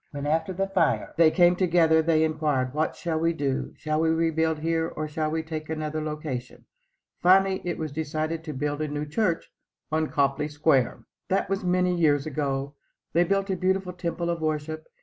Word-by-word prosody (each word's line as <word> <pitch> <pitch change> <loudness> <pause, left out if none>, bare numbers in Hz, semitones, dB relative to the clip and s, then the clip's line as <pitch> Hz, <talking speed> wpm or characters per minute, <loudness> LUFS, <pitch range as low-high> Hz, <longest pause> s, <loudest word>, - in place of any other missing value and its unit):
When, 145 -1 -6
after 160 +4 0
the 195 +1 -1
fire, 195 - +1
they 165 -1 +6
came 175 +1 +4
together, 165 -3 +4
they 160 -1 +3
inquired, 150 -5 0
"What 155 +2 0
shall 165 -3 -2
we 165 +1 +2
do? 140 -4 -2
Shall 155 0 -1
we 165 - +2
rebuild 160 -1 +1
here 165 +1 0
or 155 -1 -4
shall 155 0 -2
we 160 +1 -2
take 155 -1 -6
another 155 0 -3
location?" 150 -5 -5 0.6
Finally 190 +1 +4
it 175 - -2
was 155 -2 -4
decided 155 +2 -3
to 155 - -4
build 145 +2 -2
a 155 - -1
new 145 0 -3
church 170 +3 -1 0.4
on 155 0 +1
Copley 140 +1 +1
Square. 145 -4 +1 0.2
That 195 0 0
was 195 0 -1
many 180 0 +2
years 150 -5 +2
ago. 140 -2 -2 0.4
They 170 +2 +4
built 195 +2 0
a - - +1
beautiful 185 0 0
temple 170 -1 -2
of 170 -1 -3
worship. 155 0 -3
160 Hz, 190 wpm, -26 LUFS, 150-170 Hz, 0.6 s, they